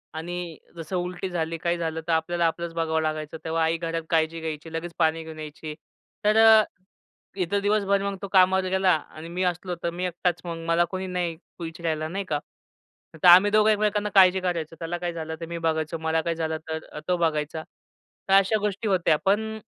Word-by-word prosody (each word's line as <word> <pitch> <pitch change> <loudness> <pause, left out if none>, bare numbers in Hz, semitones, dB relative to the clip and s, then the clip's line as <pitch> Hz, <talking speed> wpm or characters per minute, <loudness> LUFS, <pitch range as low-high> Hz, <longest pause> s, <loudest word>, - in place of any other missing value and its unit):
आणि 175 0 -5 0.2
जसं 165 +2 -5
उलटी 180 +1 -3
झाली 165 -1 -2
काही 170 0 -1
झालं, 160 -1 -3
तर - - 0
आपल्याला 170 +1 +1
आपलंच 170 0 -3
बघावं 160 -1 0
लागायचं. 155 0 -3
तेव्हा 160 0 0
आई 165 +1 +1
घरात 165 0 -3
काळजी 160 0 +1
घ्यायची, 160 0 -6
लगेच 165 +1 -4
पाणी 160 0 +2
घेऊन 160 -1 -9
यायची. 155 0 -7 0.5
तर 215 +1 +4
अ, 220 -1 +8 0.7
इथं 195 +2 0
दिवसभर 200 -1 +2
मग 200 -1 -2
तो 200 - -4
कामावर 190 0 +5
गेला 190 0 +3 0.2
आणि 160 +2 -8
मी 180 +2 -2
असलो, 180 0 -1
तर 170 - +1
मी 180 +2 -3
एकटाच 180 0 -1
मग 165 -1 -5
मला 170 +1 +3
कोणी 190 0 -3
नाही 175 -3 -2 0.2
विचरायला 160 -1 -3
नाही 195 +4 -4
का. 150 -5 -1 0.8
तर - - +7
आम्ही 185 +4 +8
दोघं 215 0 +5
एकमेकांना 210 0 +1
काळजी 190 -1 +7
कारायचो. 170 -3 -2
त्याला 165 +1 -3
काही 175 -1 -3
झालं 160 -1 -5
तर 165 - -3
मी 170 0 -5
बघायचो, 160 -1 -1
मला 160 0 0
काही 165 0 -2
झालं 160 -1 -2
तर 160 0 -3
अ, - - -7
तो 180 - +2
बघायचा. 155 -1 -1 0.7
तर - - +4
अशा 195 +3 +5
गोष्टी 210 +1 -2
होत्या. 175 -5 +3
पण 220 +2 +1
170 Hz, 200 wpm, -25 LUFS, 160-185 Hz, 0.8 s, अ